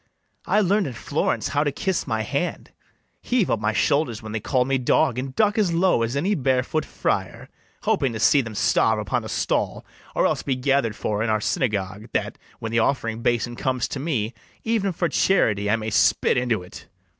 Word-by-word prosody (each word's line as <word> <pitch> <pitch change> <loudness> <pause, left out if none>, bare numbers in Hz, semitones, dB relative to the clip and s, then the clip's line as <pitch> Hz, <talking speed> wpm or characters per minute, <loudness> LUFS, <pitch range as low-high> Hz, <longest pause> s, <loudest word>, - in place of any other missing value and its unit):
I 210 - +3
learn'd 200 +1 +2
in 130 - -5
Florence 115 - -1
how 145 - +1
to 145 - 0
kiss 185 +4 -2
my 110 -2 -1
hand, 140 +10 -3 0.5
Heave 245 -6 +1
up 110 - +1
my 105 0 0
shoulders 120 0 +1
when 110 - -7
they 110 - -2
call 125 +3 +1
me 135 0 +1
dog, 125 0 +2
And 130 0 -5
duck 215 0 +2
as 190 -5 +2
low 175 -6 +3
as 115 +3 -1
any 180 +9 +1
bare 130 -6 +1
foot 155 +3 -2
friar; - - -3 0.3
Hoping 135 - +1
to 110 - -4
see 140 +5 +5
them 115 -4 -7
starve - - +2
upon - - -1
a - - -7
stall, - - -1 0.3
Or - - +2
else - - +1
be 135 - -1
gather'd 130 -4 +1
for 105 -1 -2
in 110 - 0
our 110 0 +2
synagogue, 105 - -2
That, - - -2 0.2
when 110 - -5
the 115 - +2
offering 115 -2 0
basin 120 0 0
comes 130 0 -1
to 140 - -4
me, 125 -7 -2 0.3
Even 220 -4 0
for 170 0 -1
charity 105 - +2
I 105 - +4
may 110 -1 -4
spit - - +3
into't. 115 -8 -2
125 Hz, 200 wpm, -23 LUFS, 110-155 Hz, 0.5 s, see